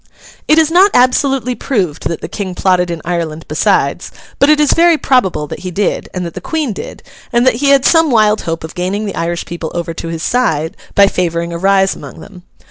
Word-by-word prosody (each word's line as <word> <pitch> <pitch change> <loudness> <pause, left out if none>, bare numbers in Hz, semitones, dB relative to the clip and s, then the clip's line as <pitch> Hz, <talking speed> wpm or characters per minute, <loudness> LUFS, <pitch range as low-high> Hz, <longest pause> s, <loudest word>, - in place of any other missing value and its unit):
It 310 - +4
is 320 -1 +3
not 375 +4 +5
absolutely 255 0 +2
proved 195 - -2
that 165 - -5
the - - -5
King 190 -4 -5
plotted 180 -1 +1
in 170 -2 -5
Ireland 165 -2 -3
besides, - - 0 0.3
but 280 - +4
it 305 0 +4
is 300 -2 +3
very 335 -1 +4
probable 195 - +1
that - - -8
he 185 - -6
did, 195 +3 -2
and 180 -1 -4
that 170 - -6
the - - -7
Queen 310 -8 -2
did, - - -9 0.3
and 240 +1 +2
that 255 -3 +3
he 280 - +3
had 275 -1 +4
some 325 -2 +4
wild 215 -3 +3
hope 165 -1 -4
of 160 - -8
gaining 190 +4 -3
the 200 - -4
Irish 170 +1 -3
people 170 -2 -6
over 170 -1 -3
to 165 - -7
his 165 0 -5
side 165 -8 0 0.2
by 200 - +7
favouring 170 -3 -2
a 170 - -4
rise 195 +1 +2
among - - -11
them. 190 -3 -13
195 Hz, 220 wpm, -14 LUFS, 170-255 Hz, 0.3 s, by